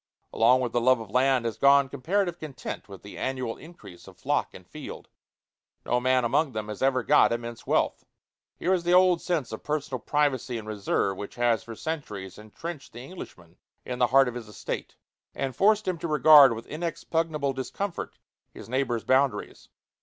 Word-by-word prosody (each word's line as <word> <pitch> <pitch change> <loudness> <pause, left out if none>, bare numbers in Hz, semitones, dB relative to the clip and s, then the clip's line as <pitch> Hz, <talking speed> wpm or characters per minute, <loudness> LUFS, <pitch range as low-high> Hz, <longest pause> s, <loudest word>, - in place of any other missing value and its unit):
Along 125 +3 +4
with 120 -2 -2
the 120 - 0
love 130 0 +4
of 110 -3 -9
land 130 0 +2
has 115 - -3
gone 140 0 +5
comparative 175 +7 -1
content 135 -8 -7
with 95 -1 -11
the 100 - -10
annual 130 -3 -3
increase 140 - -14
of - - -14
flock - - -1
and - - -13
field. - - -9 0.8
No 125 - +1
man 130 0 +2
among 140 +4 +1
them 110 -1 -4
has 105 - -7
ever 130 -2 +2
got 150 +4 +5
immense 115 -1 -5
wealth. - - +1 0.5
Here 185 - +1
is 180 -2 0
the 175 +1 +3
old 180 -2 +5
sense 165 -9 -2
of 110 - -6
personal 145 -4 -3
privacy 135 -2 0
and 110 -1 -8
reserve 100 -2 -1
which 100 - -7
has 120 -2 +1
for 115 - -9
centuries 105 - -6
intrenched 140 +8 -8
the 120 - -9
Englishman 90 - -11 0.3
in 125 -1 -5
the 125 - +4
heart 135 +1 +5
of 125 - -3
his 120 -2 -7
estate, 105 - -6 0.4
and 135 -2 -3
forced 210 +6 +3
him 180 -3 -1
to 170 - -3
regard 150 -4 +7
with 115 - -8
inexpugnable 160 -2 -2
discomfort 170 +9 -5 0.3
his - - -11
neighbor's 125 -2 -1
boundaries. 130 -5 0
130 Hz, 185 wpm, -27 LUFS, 115-155 Hz, 0.8 s, regard